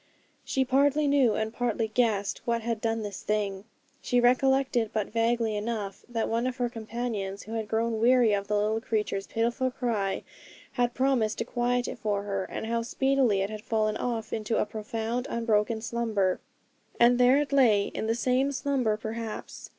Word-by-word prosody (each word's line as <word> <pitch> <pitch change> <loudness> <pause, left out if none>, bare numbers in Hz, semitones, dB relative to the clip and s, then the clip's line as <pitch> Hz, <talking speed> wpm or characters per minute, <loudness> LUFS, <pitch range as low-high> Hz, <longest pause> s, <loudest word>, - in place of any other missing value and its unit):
She 265 -1 0
partly 280 +3 +3
knew, 275 -5 +3
and 220 0 -2
partly 235 -2 -1
guessed, 215 -4 0
what 235 -1 0
had 230 -1 -2
done 225 -1 -1
this 205 -2 -6
thing. 205 -2 -2 0.4
She 245 - +1
recollected, 255 -1 +3
but 215 -1 -2
vaguely 230 -1 +1
enough, 210 -2 -4
that 230 -2 -1
one 230 +2 0
of 255 0 -3
her 245 -2 0
companions, 220 -4 -4
who 220 - -8
had 220 -2 -2
grown 225 0 0
weary 240 -2 +5
of 200 0 -1
the 210 - 0
little 215 +2 0
creature's 210 -3 -2
pitiful 235 +3 0
cry, 215 -6 -2 0.5
had 245 -2 0
promised 255 -5 +1
to 230 - -2
quiet 245 0 0
it - - -6
for 205 -2 -1
her, 195 -2 -2
and - - -5
how 230 +1 0
speedily 255 -3 +2
it 195 +2 -2
had 215 -1 -6
fallen 215 -1 0
off 235 -3 -3
into 220 +1 -1
a - - +2
profound, 225 +3 -3
unbroken 220 -1 +1
slumber. 220 -6 0 0.6
And 240 +1 +5
there 250 +2 +6
it 290 -1 -1
lay, 230 -7 +5
in 220 - -3
the 225 - +1
same 255 +3 +1
slumber 260 -6 0
perhaps. 220 0 -6
230 Hz, 180 wpm, -28 LUFS, 215-245 Hz, 0.6 s, there